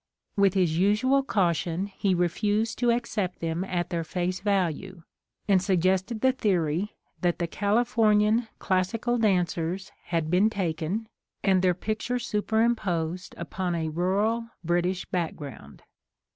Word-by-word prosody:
With 200 -1 +3
his 170 -4 +2
usual 215 +8 +3
caution 175 - 0
he 200 -1 0
refused 205 +6 0
to 240 0 +2
accept 230 -6 -1
them 165 +2 -2
at 175 -3 -2
their 170 -1 -1
face 180 +2 -2
value, 190 -2 -1 0.4
and 195 -3 +4
suggested 190 +3 +1
the 260 - +5
theory 190 - 0 0.3
that 175 -2 +1
the 170 - -1
Califor 215 +2 +2
nian 220 +3 +2
Classical 210 +6 0
dancers 185 -3 0
had 165 -2 -1
been 190 +5 +4
taken 190 +1 -2 0.4
and 190 -2 +4
their 180 -1 +3
picture 215 +6 -2
superimposed 210 -7 -1
upon 175 +2 -3
a 160 -1 -1
rural 200 +8 0 0.2
British 175 +2 0
background. 155 -7 -5
190 Hz, 130 wpm, -27 LUFS, 175-215 Hz, 0.4 s, the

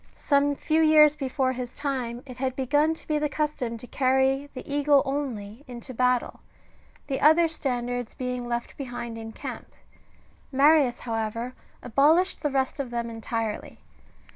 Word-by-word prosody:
^ - - -30
Some 285 0 +2
few 315 +3 +1
years 305 -1 +6
before 265 -2 -1
his 250 -1 -6
time 255 -4 -3
it 255 -2 -10
had 260 0 -2
begun 295 +4 +2
to - - -10
be 305 -1 +1
the 300 0 0
custom 285 -6 -2
to 230 - -9
carry 265 +2 +1
the 255 - -8
eagle 285 -1 +3
only 260 -5 -4
into 250 +1 -8
battle, 250 0 +1 0.7
the 270 - -3
other 320 +3 +6
standards 245 -6 -3
being 250 -1 -3
left 235 0 -4
behind 245 -4 -5
in 225 0 -7
camp; - - -8 0.8
Marius, 275 -2 +4
however, 230 +1 -3 0.3
abolished 305 +10 +3
the 295 - 0
rest 270 0 -1
of 270 -3 -3
them 235 -1 -3
entirely. 225 -1 -4
260 Hz, 155 wpm, -26 LUFS, 240-290 Hz, 0.8 s, years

